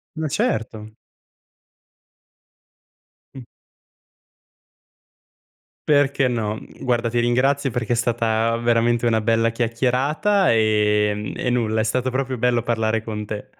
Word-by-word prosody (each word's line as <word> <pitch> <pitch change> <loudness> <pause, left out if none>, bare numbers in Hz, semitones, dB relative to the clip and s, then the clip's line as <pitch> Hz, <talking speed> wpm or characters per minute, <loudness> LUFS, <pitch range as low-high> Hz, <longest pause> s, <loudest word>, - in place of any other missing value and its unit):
Ma 160 -1 -3
certo. 110 -4 -2 2.4
Mh. 135 - -9 2.5
Perché 140 -2 +3
no. 110 -3 -2
Mhmm, 110 - -12
guarda 120 -2 0
ti 120 - -1
ringrazio 130 +3 +1
perché 120 0 -1
è - - -1
stata 115 -1 0
veramente 120 0 +1
una 110 -1 +2
bella 115 +1 +1
chiacchierata, 130 - +1
ehm, 105 -1 +1
e 125 - -2
nulla, 110 -3 0
è - - +2
stato 125 +3 -1
proprio 130 0 -3
bello 120 0 +1
parlare 110 -2 -1
con 105 -1 -5
te. 105 0 -6
115 Hz, 115 wpm, -21 LUFS, 110-125 Hz, 2.5 s, Perché